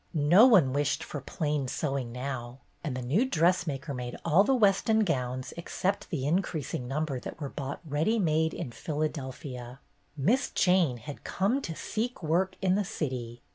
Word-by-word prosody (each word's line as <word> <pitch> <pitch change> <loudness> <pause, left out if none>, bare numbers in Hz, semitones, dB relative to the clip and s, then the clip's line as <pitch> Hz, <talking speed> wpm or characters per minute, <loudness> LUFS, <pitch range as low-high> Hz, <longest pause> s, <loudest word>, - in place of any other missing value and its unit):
No 170 - +7
one 175 - +5
wished 145 0 0
for 145 - -6
plain 145 0 -2
sewing 135 -3 -2
now, 125 -1 -5 0.3
and 140 -6 -3
the 130 - -4
new 150 - +2
dressmaker 165 - +1
made 125 -1 -5
all 170 +4 +5
the 265 +5 +3
Weston 220 0 +3
gowns 130 -8 -1
except 185 +3 -2
the 140 -6 -2
increasing 155 -6 -1
number 140 0 -2
that - - -8
were 145 -3 -4
bought 140 0 -5
"ready 155 +10 +1
made" 160 -4 +2
in 155 -8 -5
Philadelphia. 130 -4 -4 0.4
Miss 220 - +2
Jane 180 -8 +3
had 140 +5 -9
come 210 +9 0
to 165 -10 -5
seek 230 +2 -3
work 185 +4 +1
in 185 -1 +3
the 205 +2 +2
city! 130 - -4
150 Hz, 165 wpm, -29 LUFS, 130-185 Hz, 0.4 s, No